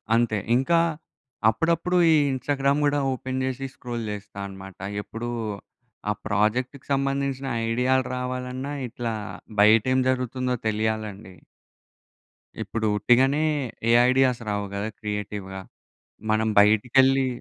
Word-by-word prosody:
అంతే. 115 -2 +2 0.2
ఇంకా 150 +7 +3 0.7
అప్పుడప్పుడు 170 +8 +1
ఈ - - +6 0.2
ఇన్స్టాగ్రామ్ 140 +2 0
గూడా 145 0 +2
ఓపెన్ 130 +1 -4
జేశి 130 +1 -3
స్క్రోల్ 120 -2 -5
చేస్తా 100 -1 -8
అన్నమాట. 95 -1 -11 0.2
ఎప్పుడు 115 +3 -6 0.8
ఆ - - +3
ప్రాజెక్ట్‌కి 120 +6 0
సంబంధించిన 135 0 -1 0.2
ఐడియాలు 125 +2 +2
రావాలన్నా, 125 +2 -4
ఇట్లా 115 0 -4 0.5
బయటేం 115 +5 +5
జరుగుతుందో 130 0 -1
తెలియాలండి. 110 -2 -2 1.3
ఇప్పుడు 110 -1 -2
ఉట్టిగనే 130 +7 +3 0.5
ఏ - - +5 0.2
ఐడియాస్ 130 -2 +3
రావు 105 0 -1
గదా! 100 +2 -2
క్రియేటివ్‌గా. 105 -2 -5 0.7
మనం 110 +1 +2
బయటికెళ్ళి 130 +6 +4
125 Hz, 105 wpm, -25 LUFS, 110-135 Hz, 1.3 s, ఈ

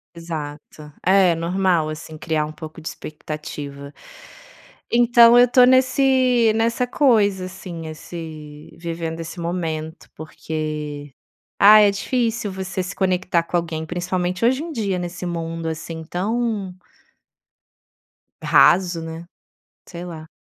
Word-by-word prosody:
Exato. 150 -2 -8
É, 190 -2 +5
normal 170 -1 0
assim, 155 0 -8
criar 155 -1 -1
um 150 - -7
pouco 155 +1 -10
de 155 - -8
expectativa. 150 -2 -8 1.0
Então 235 0 +6
eu 245 - +8
estou 250 0 +5
nesse 255 -2 +3
nessa 230 +2 +1
coisa 210 -9 +2
assim, 175 -3 -8
esse 155 -2 -9
vivendo 165 -1 -5
esse 165 +2 -8
momento, 165 -2 -4
porque 150 -2 -6 0.5
ah, 210 +2 +9
é 205 - +6
difícil 225 0 -1
você 190 0 -4
se 185 - -6
conectar 185 -2 +1
com 175 - -5
alguém, 160 -2 -3
principalmente 180 +3 -2
hoje 260 +5 +2
em 335 - -6
dia, 200 -6 -1
nesse 175 +1 -6
mundo 165 -1 -4
assim, 160 +1 -5
tão 205 +1 -2 1.7
raso, 175 -2 +4
né. 165 +1 -7 0.6
Sei 175 -1 -8
lá. 160 -3 -9
175 Hz, 120 wpm, -21 LUFS, 160-205 Hz, 1.7 s, ah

